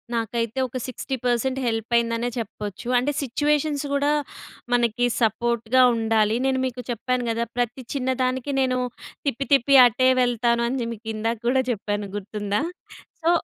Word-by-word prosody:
నాకైతే 230 +2 -2
ఒక 255 +1 -6
60 265 +1 -4
పర్సెంట్ 255 +2 +1
హెల్పయిందనే 230 +1 0
చెప్పొచ్చు. 215 0 -6
అంటే 255 +4 +1
సిచ్యువేషన్స్ 295 +2 0
గూడా 285 +1 +2 0.6
మనకి 240 0 +2 0.2
సపోర్ట్‌గా 235 +2 +2
ఉండాలి. 220 -1 +2
నేను 265 -1 +1
మీకు 250 -1 -4
చెప్పాను 250 +2 -1
గదా! 230 +1 0
ప్రతి 245 +2 -1
చిన్న 260 -2 -1
దానికి 260 +2 -1
నేను 255 -1 +1 0.5
తిప్పి 275 0 -1
తిప్పి 275 +1 +4
అటే 255 +3 +2
వెళ్తాను 235 -1 +2
అని 245 -2 -2
మీకిందాక 220 +1 -3
కూడా 260 +2 +3
జెప్పాను 205 -3 -2
గుర్తుందా? 205 +2 -2 0.6
సో 330 - +2
240 Hz, 135 wpm, -24 LUFS, 225-260 Hz, 0.6 s, తిప్పి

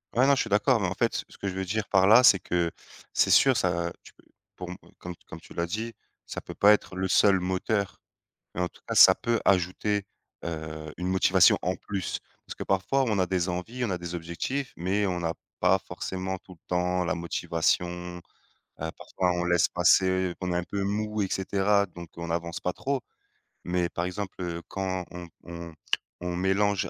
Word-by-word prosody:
Ouais 125 +3 +5
non 140 - +5
je 135 - +2
suis 115 - -3
d'accord, 105 +4 +3
mais 95 - +1
en 95 - -3
fait, 115 -1 0
ce - - -15
que 100 - -4
je 95 - -2
veux 95 0 -3
dire 100 +2 -2
par 95 0 +4
là 115 +4 +8
c'est 100 -7 +7
que, 85 -1 0 0.4
c'est - - +3
sûr 135 -1 +6
ça 85 -4 0
tu - - -15
peux - - -25 0.3
pour 90 -1 -7
me - - -6 0.2
comme 90 0 -7
comme 80 - -9
tu - - -15
l'as 85 0 -1
dit: 110 +5 -4 0.3
«Ça - - -6
peut - - -9
pas 105 +1 +7
être 100 -2 -2
le 95 0 -1
seul 95 0 +5
moteur» 95 +3 -1 0.5
mais 90 - -2
en 90 - +1
tout - - -21
cas - - -2
ça - - +9
peut 115 -1 0
ajouter, 95 +2 +1 0.4
heu, 80 -2 -5
une 90 +1 -3
motivation 95 -1 +5
en 90 +2 0
plus, 95 -2 -4 0.3
parce - - -7
que - - -5
parfois 95 +8 +1
on 110 -4 0
a 95 - +3
des 90 0 0
envies, 110 +8 -4
on 120 - 0
a 90 - -1
des 85 0 -6
objectifs, 85 +11 -3
mais 95 +4 0
on 90 -2 -1
n'a 85 0 -1 0.3
pas 90 +2 +4
forcément 95 0 -4
tout 95 - -15
le 80 - -23
temps 90 0 +1
la 85 - -1
motivation. 85 0 0 0.9
Heu, 80 +1 -3
parfois 90 -1 -1
on 85 - -1
laisse 85 -1 +3
passer, 95 0 +3
qu'on 90 -1 -2
est - - -1
un 90 - -1
peu 100 +3 -3
mou 105 +1 -1
et 95 - +1
cetera 100 +2 +2
donc 85 -2 -10
on 85 0 -6
n'avance 85 0 -3
pas 90 - 0
trop, 135 +7 -2 0.6
mais 90 0 0
par 85 - -3
exemple, 95 +2 -4
heu, 85 -1 -3
quand 95 -2 -3
on 90 -1 -8
on 85 -1 -8 0.5
on 90 0 -3
mélange 95 +2 +1
90 Hz, 210 wpm, -27 LUFS, 85-100 Hz, 0.9 s, ça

